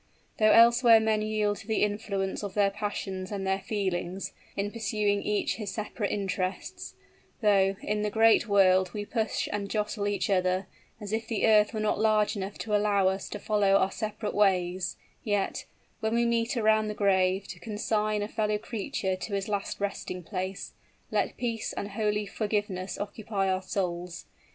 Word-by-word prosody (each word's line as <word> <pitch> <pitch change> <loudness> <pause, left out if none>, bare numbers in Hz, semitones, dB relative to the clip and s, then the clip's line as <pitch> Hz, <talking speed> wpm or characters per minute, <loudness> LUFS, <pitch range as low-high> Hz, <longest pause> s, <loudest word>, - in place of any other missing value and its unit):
Though 215 0 +5
elsewhere 235 0 +7
men 220 -1 +1
yield 215 -1 0
to 220 - -12
the 220 -2 +1
influence 205 -2 -2
of 205 -2 -6
their 200 -1 +3
passions 195 -2 -4
and 195 -2 -3
their 190 0 +1
feelings, 190 -2 -3 0.2
in 200 +1 -1
pursuing 210 -2 0
each 210 -1 -1
his 210 -3 -4
separate 210 0 -3
interests 190 -2 -3 0.5
though, 195 -2 +4
in 210 0 -1
the 210 - 0
great 225 +2 +4
world, 185 -3 +4
we 205 0 -3
push 220 0 -1
and 200 -1 -3
jostle 210 -1 -1
each 205 0 0
other, 185 -1 +1 0.3
as 210 -1 -6
if 220 0 -2
the 225 -3 0
earth 210 -2 +5
were 220 - -4
not 215 -1 0
large 215 -1 +3
enough 200 0 -5
to 210 -2 -1
allow 205 -2 +3
us 190 +1 -4
to - - -5
follow 205 -2 +2
our 195 -1 +3
separate 215 0 -4
ways 185 -2 +1 0.3
yet, 205 -4 -1 0.3
when 220 +1 0
we 235 0 +3
meet 235 +2 0
around 215 -1 +3
the 210 - -4
grave, 190 -1 +2
to 175 - -8
consign 210 +1 -1
a - - -3
fellow 210 -1 0
creature 210 -3 -3
to 200 +2 -4
his 195 -1 -2
last 205 -2 -3
resting 195 -2 -4
place, 185 +3 -5 0.4
let - - 0
peace 230 -3 -2
and 200 - -4
holy 210 0 0
forgiveness 205 -2 -2
occupy 205 -1 -2
our 185 0 +1
souls. 180 -2 -3
205 Hz, 175 wpm, -28 LUFS, 195-215 Hz, 0.5 s, elsewhere